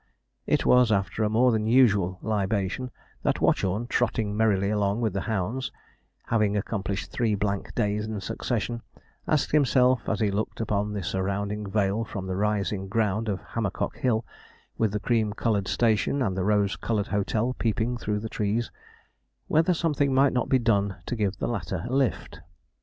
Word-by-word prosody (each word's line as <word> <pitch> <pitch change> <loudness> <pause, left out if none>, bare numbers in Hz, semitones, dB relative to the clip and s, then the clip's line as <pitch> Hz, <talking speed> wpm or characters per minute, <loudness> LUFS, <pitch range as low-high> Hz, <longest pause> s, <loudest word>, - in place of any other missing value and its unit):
It - - +2
was 125 -2 +5
after 100 +1 0
a 105 - +2
more 120 +4 +4
than 110 -1 0
usual 105 -7 +4
libation 105 +3 -1 0.3
that - - 0
Watchorn, 100 +5 +1
trotting 110 -4 0
merrily 105 -2 +2
along 100 0 +1
with 110 -4 0
the 100 - -1
hounds, 110 +5 -2 0.5
having 105 -2 +1
accomplished 100 -1 -3
three 115 -3 +1
blank 100 -1 -2
days 105 -1 0
in 110 -2 -4
succession, 115 +2 -3 0.5
asked 150 -2 +1
himself, 130 -4 +3
as 110 - 0
he 105 -3 +1
looked 105 +3 -3
upon 105 -2 -1
the 100 -2 -3
surrounding 100 +3 -2
vale 100 +2 +1
from 100 -3 -6
the 95 -1 -3
rising 100 -1 -1
ground 110 +1 0
of 95 -2 -2
Hammercock 105 -5 -2
Hill, 115 -3 0 0.5
with 110 -3 +1
the 105 - -1
cream 110 -2 +1
coloured 105 -3 0
station 115 +4 +1
and 95 -5 -1
the 95 - -1
rose 100 0 +2
coloured 105 -3 -1
hotel 105 +4 0
peeping 115 0 -1
through 105 -3 -2
the 110 - -4
trees, 110 +2 -1 0.7
whether 165 +3 +3
something 145 -4 +1
might 135 +1 +4
not 125 - 0
be 130 - +5
done 100 -5 +1
to - - -3
give 105 -3 -1
the - - -2
latter 95 -5 -3
a 125 - -4
lift. 135 -3 0
105 Hz, 170 wpm, -26 LUFS, 100-115 Hz, 0.7 s, was